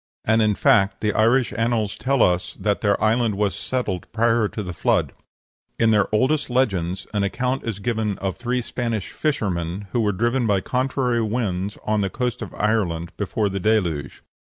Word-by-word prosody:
And, 110 +1 +3
in 105 -1 +2
fact, 100 -1 +3
the 105 -1 +1
Irish 115 0 +3
annals 115 -2 0
tell 135 -1 +2
us 90 0 0
that 100 +1 0
their 100 -2 +2
island 110 -1 +2
was 100 0 0
settled 105 -9 -3
prior 115 0 +2
to 105 - -5
the 90 -2 -5
Flood. - - +1 0.7
In 115 -1 +3
their 105 -2 +3
oldest 130 +8 +1
legends 95 -8 0
an 105 - +1
account 125 +7 -1
is 115 -4 -3
given 110 -1 -1
of 95 -1 -3
three 125 +1 -2
Spanish 115 -4 -3
fishermen 95 - -2
who 120 - 0
were 105 -2 +2
driven 120 +5 0
by 100 -2 +3
contrary 125 +1 0
winds 105 -4 -2
on 105 -1 +1
the 100 - 0
coast 125 +3 -2
of - - -6
Ireland 90 -6 0
before 105 +1 -1
the 100 0 -3
Deluge. 90 -9 0
110 Hz, 180 wpm, -22 LUFS, 100-120 Hz, 0.7 s, And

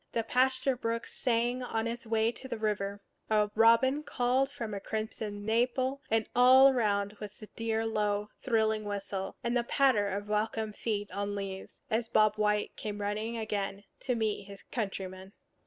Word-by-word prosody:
The 230 - 0
pasture 260 +2 +2
brook 230 -1 -2
sang 240 +1 0
on 225 -2 -2
its 235 0 -5
way 225 0 +2
to 260 - -10
the 245 - -4
river; 205 -2 -2 0.3
a 210 -1 +2
robin 230 +6 +5
called 260 -1 +1
from 230 -6 -5
a 200 - -3
crimson 215 -1 -4
maple; 255 +4 +1
and 225 -1 +1
all 260 +2 +8
around 205 -5 +1
was 210 -1 -8
the 215 - -9
dear 225 0 -1
low, 210 -1 0
thrilling 220 -3 +1
whistle, 200 -1 -4
and 235 +1 0
the 240 - +2
patter 245 -5 +3
of 200 +1 -3
welcome 215 +1 -1
feet 205 -2 -3
on 200 0 -3
leaves, 195 -1 -6
as 225 +1 +1
Bob 215 -2 +4
White 210 0 +1
came 210 -1 -5
running 215 +3 -2
again 205 -2 -3 0.2
to 250 -2 -1
meet 215 -3 -1
his 200 -1 -11
countryman. 190 -3 -4
220 Hz, 170 wpm, -31 LUFS, 205-235 Hz, 0.3 s, all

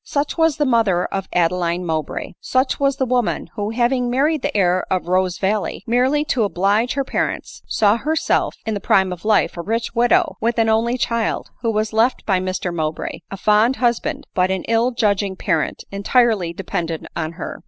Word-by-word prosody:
Such 285 0 -2
was 325 -3 +2
the 295 - +1
mother 220 -8 +2
of 195 -1 -4
Apeeine 175 0 0
Mowbray! 155 -3 -3
Such 260 +1 0
was 275 -1 +2
the 265 - +1
woman, 245 -2 -1
who; 205 -1 -2
having 245 +2 +1
married 285 +4 +1
the - - -2
heir 180 -1 +2
of 185 -2 -1
Rose 185 -1 +1
valley, 200 +1 -1
merely 260 +5 +2
to 245 -6 +1
oblige 205 +4 +1
her 275 - 0
parents, - - -3
saw 210 +1 +3
herself 310 +6 0
in 220 - -1
the 205 - -2
prime 190 -1 +2
of 180 +3 -11
life, 215 -1 +2
a - - -2
rich 225 +6 -2
widow, 240 0 +2
with 235 +1 0
an 225 -1 +3
only 230 +3 +2
child, 230 -2 -1
who 230 - 0
was 215 0 -1
left 230 +4 +1
by 190 -3 +2
Mr 185 -1 -3
Mowbray, 155 -2 -3
a 195 - -6
fond 215 +5 +3
husband, 240 -3 -1
but 185 0 +2
an 190 -1 -1
ill 230 +2 +2
judging 205 -5 0
parent, 160 -3 -1
entirely 200 -2 +2
dependent 170 -2 -4
on 160 0 -3
her 175 - -7
215 Hz, 190 wpm, -20 LUFS, 185-245 Hz, -, saw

